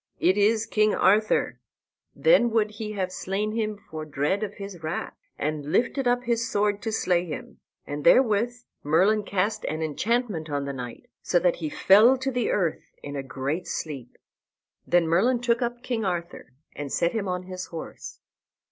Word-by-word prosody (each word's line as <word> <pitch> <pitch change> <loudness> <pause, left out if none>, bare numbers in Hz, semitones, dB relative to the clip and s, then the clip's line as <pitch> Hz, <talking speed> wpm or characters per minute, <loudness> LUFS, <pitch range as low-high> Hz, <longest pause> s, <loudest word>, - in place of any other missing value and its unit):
"It 185 +2 +3
is 215 +2 +3
King 215 -2 +2
Arthur." 210 +3 +2 0.6
Then 485 - +4
would 220 -2 +1
he 215 0 -6
have 190 -3 -2
slain 195 +3 -2
him 215 -1 -2
for 160 -5 -8
dread 150 +6 -1
of 210 -1 -4
his 195 -4 -8
wrath, 160 +2 -4 0.2
and 150 0 -3
lifted 245 - +1
up 245 0 +2
his 235 -1 0
sword 205 0 +1
to 225 - -3
slay 180 -5 +1
him; 160 -4 -8 0.3
and 145 0 -5
therewith 230 -2 +4 0.3
Merlin 185 +9 +3
cast 205 +2 -1
an 155 +1 -2
enchantment 195 - -1
on 145 -1 -2
the 140 - -4
knight, 125 - -8
so - - +1
that - - +2
he 310 - -3
fell 245 -3 +6
to 265 +1 -2
the 245 -3 0
earth 175 -6 0 0.2
in 145 0 -6
a 140 - -2
great 135 +5 -4
sleep. 140 -6 -5 0.7
Then 175 -1 +3
Merlin 225 +10 +3
took 240 0 +1
up 240 0 -3
King 240 -3 -2
Arthur, 175 -8 -4 0.2
and 145 -2 -5
set 170 - +1
him 215 -4 -2
on 180 0 -2
his 185 0 -7
horse. 165 -2 -8
200 Hz, 175 wpm, -26 LUFS, 160-230 Hz, 0.7 s, fell